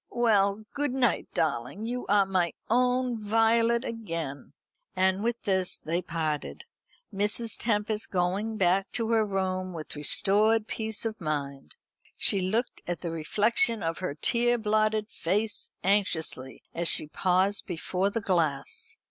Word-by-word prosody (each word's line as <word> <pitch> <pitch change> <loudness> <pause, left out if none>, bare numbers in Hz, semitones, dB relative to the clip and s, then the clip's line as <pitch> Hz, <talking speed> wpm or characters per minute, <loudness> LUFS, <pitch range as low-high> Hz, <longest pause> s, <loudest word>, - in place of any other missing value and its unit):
Well, 215 -3 +2
good 290 -2 -1
night, 255 -4 +1
darling. 140 - -2
You 245 +2 -4
are 200 -1 +4
my 185 -3 0 0.2
own 250 0 +2
Violet 230 +3 +3
again." 165 -11 -5 0.4
And 190 +2 +2
with 235 0 -1
this 190 -3 +1
they 170 +3 -2
parted; 155 - -3 0.5
Mrs. 210 +3 0
Tempest 210 -1 -1
going 195 +5 -1
back 190 0 +2
to 230 -1 0
her 225 -1 +4
room 185 -2 -2
with 160 -2 -7
restored 210 +9 +3
peace 220 0 -3
of 220 -3 -4
mind. 140 -3 -4 0.4
She 200 - +5
looked 215 +7 -1
at 175 -1 -3
the 170 - -3
reflection 215 - +1
of 165 0 -2
her 180 -6 -3
tear 240 +8 +2
blotted 215 -1 +1
face 210 +2 -2
anxiously 175 -9 0
as 170 0 0
she - - +5
paused 185 +6 +1
before 180 +2 -1
the 230 +2 -2
glass. 185 - -1
200 Hz, 140 wpm, -28 LUFS, 175-225 Hz, 0.5 s, She